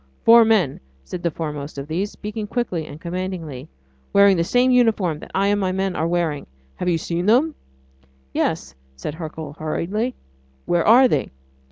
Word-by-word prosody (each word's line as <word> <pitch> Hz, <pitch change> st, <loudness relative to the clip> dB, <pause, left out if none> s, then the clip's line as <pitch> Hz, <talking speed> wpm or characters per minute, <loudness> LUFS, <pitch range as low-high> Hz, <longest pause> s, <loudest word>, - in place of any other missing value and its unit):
"Four 230 Hz, 0 st, +8 dB
men," 200 Hz, -11 st, +2 dB, 0.2 s
said 175 Hz, -, -6 dB
the 170 Hz, -, +1 dB
foremost 150 Hz, -3 st, -5 dB
of 140 Hz, +1 st, -5 dB
these, 180 Hz, +6 st, -2 dB
speaking 210 Hz, 0 st, -6 dB
quickly 195 Hz, -9 st, -2 dB
and 150 Hz, -, -10 dB
commandingly, 170 Hz, -6 st, -5 dB, 0.4 s
"wearing 200 Hz, -1 st, +6 dB
the 170 Hz, -, +1 dB
same 250 Hz, +8 st, +3 dB
uniform 215 Hz, -10 st, +2 dB
that -, -, -11 dB
I 195 Hz, +1 st, +2 dB
and 205 Hz, 0 st, +1 dB
my 185 Hz, -1 st, 0 dB
men 190 Hz, 0 st, -1 dB
are 160 Hz, -, 0 dB
wearing... 170 Hz, -4 st, -1 dB, 0.3 s
have 180 Hz, -, -1 dB
you 170 Hz, -, +2 dB
seen 170 Hz, +3 st, -3 dB
them?" 270 Hz, +9 st, +4 dB, 0.8 s
"Yes," 65 Hz, -, -1 dB, 0.2 s
said 65 Hz, -, -5 dB
Hercule 155 Hz, -2 st, -7 dB
hurriedly. 205 Hz, +10 st, -2 dB, 0.5 s
"Where 175 Hz, -1 st, +2 dB
are 250 Hz, +4 st, +7 dB
they?" 145 Hz, -, 0 dB
180 Hz, 170 wpm, -22 LUFS, 160-210 Hz, 0.8 s, Four